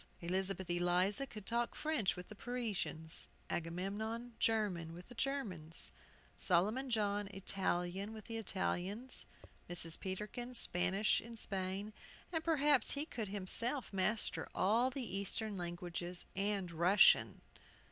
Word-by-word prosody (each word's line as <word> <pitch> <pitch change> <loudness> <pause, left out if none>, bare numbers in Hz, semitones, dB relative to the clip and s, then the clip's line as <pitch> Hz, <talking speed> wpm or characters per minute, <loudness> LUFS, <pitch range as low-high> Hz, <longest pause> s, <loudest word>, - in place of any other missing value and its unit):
Elizabeth 190 +1 -1
Eliza 180 +8 +2
could 210 -5 -9
talk 235 +2 0
French 300 -11 +1
with 180 0 -8
the - - -9
Parisians; 210 -9 -2 0.2
Agamemnon, 205 +8 -3
German 195 -7 +1
with 175 +4 -11
the - - -10
Germans; 225 - +2 0.5
Solomon 210 +9 +2
John, 205 -3 +1
Italian 195 0 -1
with 220 -2 -9
the 230 -1 -4
Italians; 205 +3 -1 0.4
Mrs. 165 -2 -1
Peterkin, 210 +6 -4
Spanish 185 0 +3
in 230 0 -10
Spain; 195 +1 -3 0.4
and 325 -1 0
perhaps 295 -5 +4
he 290 +1 0
could 225 -9 -4
himself 210 +7 0
master 210 +3 0
all 225 +7 +3
the 260 -1 -4
Eastern 205 +2 -1
Languages 175 0 -4
and 195 -2 -1
Russian. 175 +5 +5
200 Hz, 120 wpm, -37 LUFS, 180-230 Hz, 0.5 s, Russian